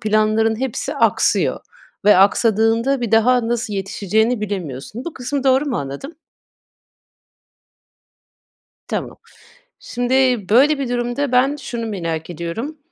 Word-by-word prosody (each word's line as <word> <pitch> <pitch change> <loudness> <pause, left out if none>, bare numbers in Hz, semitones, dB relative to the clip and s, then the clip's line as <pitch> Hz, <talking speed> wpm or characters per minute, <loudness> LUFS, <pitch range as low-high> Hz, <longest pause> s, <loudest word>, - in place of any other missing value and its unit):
planların 215 +1 +1
hepsi 265 -4 -3
aksıyor - - +1 0.4
ve 210 -2 +6
aksadığında 225 +6 +3
bir 235 -3 -2
daha 230 +1 +3
nasıl 235 -3 -2
yetişeceğini 210 +4 0
bilemiyorsun. 190 - -5
Bu 340 - -5
kısmı 270 +2 -3
doğru 265 +1 +3
mu 260 - -1
anladım? 140 - -6 2.7
Tamam. - - -4 0.6
Şimdi, 245 +1 -3 0.4
böyle, 280 +6 +4
bir 265 - -3
durumda 245 +3 -2
ben 265 +3 +3
şunu 235 -5 -5
merak 165 -6 -4
ediyorum. 175 - -5
230 Hz, 110 wpm, -19 LUFS, 205-255 Hz, 2.7 s, ve